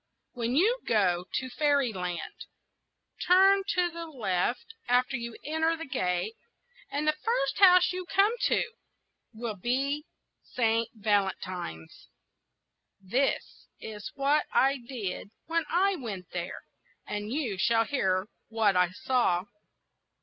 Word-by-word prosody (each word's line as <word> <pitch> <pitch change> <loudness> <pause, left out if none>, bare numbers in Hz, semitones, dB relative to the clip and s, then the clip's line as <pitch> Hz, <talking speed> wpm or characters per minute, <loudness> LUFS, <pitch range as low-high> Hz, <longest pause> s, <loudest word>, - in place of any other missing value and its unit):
When 240 0 -2
you 440 - +3
go 180 -5 +2
to 260 - -2
fairy 285 -4 +2
land, 180 -2 -5 0.8
turn 385 +2 +6
to 355 -1 +2
the 335 0 -7
left 240 - -2
after 250 +2 +2
you 235 -1 -5
enter 320 +2 0
the 330 - -6
gate, 180 -2 -1 0.5
and 290 +2 -2
the 305 - +4
first - - 0
house 365 -2 +7
you 365 -1 -5
come 400 +3 +3
to - - +3 0.7
will 225 -1 -5
be 275 - -1 0.3
Saint 230 -1 0
Valentine's. 190 - -2 0.9
This 240 +9 -1
is 210 -3 -7
what 280 +2 +2
I 275 +1 +3
did 235 -6 -5 0.2
when 330 0 0
I 380 +3 +2
went 200 - -7
there, 175 -1 -5 0.4
and 210 +1 -4
you 245 -9 -2
shall 230 +2 +3
hear 190 -8 0 0.2
what 220 -3 +2
I 180 -1 +4
saw. 195 -4 +1
245 Hz, 125 wpm, -29 LUFS, 200-315 Hz, 0.9 s, house